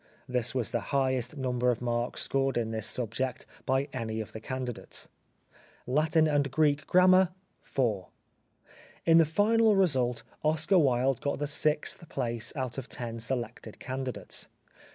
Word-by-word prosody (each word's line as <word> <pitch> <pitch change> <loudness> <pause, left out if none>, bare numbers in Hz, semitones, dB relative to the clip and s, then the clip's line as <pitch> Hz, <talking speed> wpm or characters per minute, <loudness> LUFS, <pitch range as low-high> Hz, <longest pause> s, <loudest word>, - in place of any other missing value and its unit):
(This 125 -1 0
was 120 -5 -1
the - - 0 0.2
highest 130 0 0
number 125 -2 0
of 120 -2 +1
marks 120 0 -1
scored 135 -1 0
in 115 -1 -1
this 110 -1 -1
subject 125 +2 -1 0.2
by 135 +2 +1
any 110 -3 -3
of 110 - -5
the 110 - -7
candidates.) 125 +1 -5 0.8
Latin 155 +4 +3
and 145 -2 +1
Greek 145 +1 +1
Grammar 185 0 +6 0.2
— - - -43
4. 110 -9 -1 1.0
In 165 0 +6
the 165 - +6
final 215 +6 +3
result 130 -11 +2 0.2
Oscar 155 +4 +3
Wilde 130 -2 +2
got 140 -1 -1
the 145 - -2
sixth 150 +2 -1
place 115 -2 -2
out 130 0 -3
of 130 - -9
ten 115 -1 -5
selected 115 -2 -3
candidates. 130 -1 -4
130 Hz, 150 wpm, -29 LUFS, 120-150 Hz, 1.0 s, Grammar